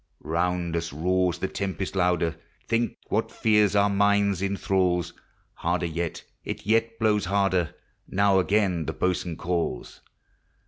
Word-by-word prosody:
Round 85 Hz, +1 st, -1 dB
us 85 Hz, 0 st, -2 dB
roars 90 Hz, +3 st, +1 dB
the -, -, -2 dB
tempest 95 Hz, -1 st, -4 dB
louder, 90 Hz, -3 st, +1 dB, 0.3 s
Think 115 Hz, 0 st, 0 dB
what -, -, 0 dB
fear 105 Hz, -1 st, +3 dB
our 100 Hz, 0 st, +5 dB
minds 100 Hz, -1 st, +2 dB
inthralls! 95 Hz, -3 st, 0 dB, 0.4 s
Harder 85 Hz, +1 st, -1 dB
yet, 85 Hz, 0 st, -3 dB, 0.2 s
it -, -, -6 dB
yet 115 Hz, +2 st, +1 dB
blows 105 Hz, -3 st, +2 dB
harder, 95 Hz, -3 st, +1 dB, 0.3 s
Now 100 Hz, 0 st, +3 dB
again 95 Hz, -4 st, +1 dB
the -, -, -2 dB
boatswain 90 Hz, -2 st, -1 dB
calls. 85 Hz, -8 st, -3 dB
95 Hz, 130 wpm, -26 LUFS, 85-100 Hz, 0.4 s, our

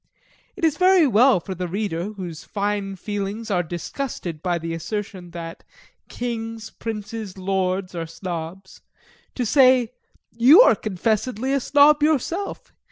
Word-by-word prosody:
It 370 Hz, -, -1 dB
is 305 Hz, -2 st, +1 dB
very 370 Hz, -2 st, +5 dB
well 250 Hz, -2 st, +5 dB
for 190 Hz, +3 st, -6 dB
the 180 Hz, 0 st, -4 dB
reader, 195 Hz, 0 st, -3 dB
whose 175 Hz, -5 st, -7 dB
fine 200 Hz, -1 st, -2 dB
feelings 205 Hz, +3 st, -4 dB
are 180 Hz, -2 st, +2 dB
disgusted 175 Hz, -, -5 dB
by 175 Hz, -1 st, 0 dB
the 165 Hz, 0 st, -5 dB
assertion 185 Hz, +2 st, -5 dB
that 170 Hz, -1 st, -8 dB, 0.5 s
Kings, 225 Hz, -2 st, -5 dB
Princes, 215 Hz, -2 st, -6 dB
Lords, 190 Hz, 0 st, -1 dB
are 165 Hz, -2 st, -4 dB
Snobs, 175 Hz, +2 st, -7 dB, 0.5 s
to 250 Hz, -, -1 dB
say 255 Hz, -1 st, +4 dB, 0.4 s
'You 250 Hz, -, +7 dB
are -, -, +6 dB
confessedly 220 Hz, +5 st, -1 dB
a 275 Hz, -, +2 dB
Snob 290 Hz, +3 st, +5 dB
yourself. 315 Hz, +6 st, -1 dB
205 Hz, 135 wpm, -23 LUFS, 180-245 Hz, 0.5 s, You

